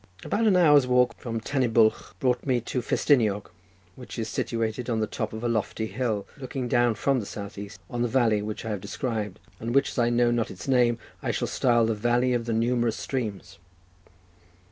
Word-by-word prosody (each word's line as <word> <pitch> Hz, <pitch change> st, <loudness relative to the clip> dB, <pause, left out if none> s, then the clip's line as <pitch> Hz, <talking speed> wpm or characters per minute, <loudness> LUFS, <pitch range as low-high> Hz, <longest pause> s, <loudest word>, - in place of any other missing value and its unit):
About 220 Hz, +2 st, +1 dB
an 200 Hz, -, +5 dB
hour's 145 Hz, -6 st, +6 dB
walk 125 Hz, 0 st, +3 dB
from 115 Hz, -2 st, -3 dB
Tan 135 Hz, +4 st, -1 dB
y 125 Hz, -, +3 dB
Bwlch 110 Hz, -1 st, +2 dB
brought 125 Hz, -2 st, +1 dB
me 130 Hz, -3 st, +1 dB
to 125 Hz, +2 st, -3 dB
Festiniog, 110 Hz, -6 st, +1 dB, 0.4 s
which 125 Hz, -1 st, -10 dB
is 110 Hz, -1 st, -2 dB
situated 115 Hz, +2 st, -2 dB
on 115 Hz, -2 st, 0 dB
the 110 Hz, -, +1 dB
top 110 Hz, 0 st, -4 dB
of 110 Hz, +1 st, -7 dB
a -, -, +1 dB
lofty 110 Hz, -1 st, -1 dB
hill 110 Hz, -1 st, -2 dB
looking 130 Hz, -2 st, -4 dB
down 120 Hz, -2 st, +2 dB
from 135 Hz, +5 st, +1 dB
the 105 Hz, -, -5 dB
south 100 Hz, -1 st, -7 dB
east, 100 Hz, 0 st, -8 dB
on 120 Hz, +4 st, -4 dB
the 120 Hz, -, +2 dB
valley 115 Hz, -4 st, +2 dB
which 105 Hz, +1 st, -5 dB
I 110 Hz, -, -2 dB
have 100 Hz, -3 st, -3 dB
described, 110 Hz, -7 st, -3 dB, 0.2 s
and 115 Hz, +3 st, -3 dB
which, 140 Hz, -, +4 dB
as -, -, -4 dB
I 120 Hz, 0 st, +3 dB
know 120 Hz, 0 st, +3 dB
not 120 Hz, -2 st, 0 dB
its 90 Hz, -, -9 dB
name, 120 Hz, -3 st, +3 dB, 0.2 s
I -, -, -3 dB
shall -, -, -1 dB
style 120 Hz, -2 st, +2 dB
the 115 Hz, -, +1 dB
Valley 120 Hz, +4 st, +1 dB
of 120 Hz, -1 st, -1 dB
the 115 Hz, -, -1 dB
numerous 120 Hz, 0 st, +1 dB
streams. 115 Hz, -7 st, -4 dB
120 Hz, 210 wpm, -26 LUFS, 110-125 Hz, 0.4 s, hour's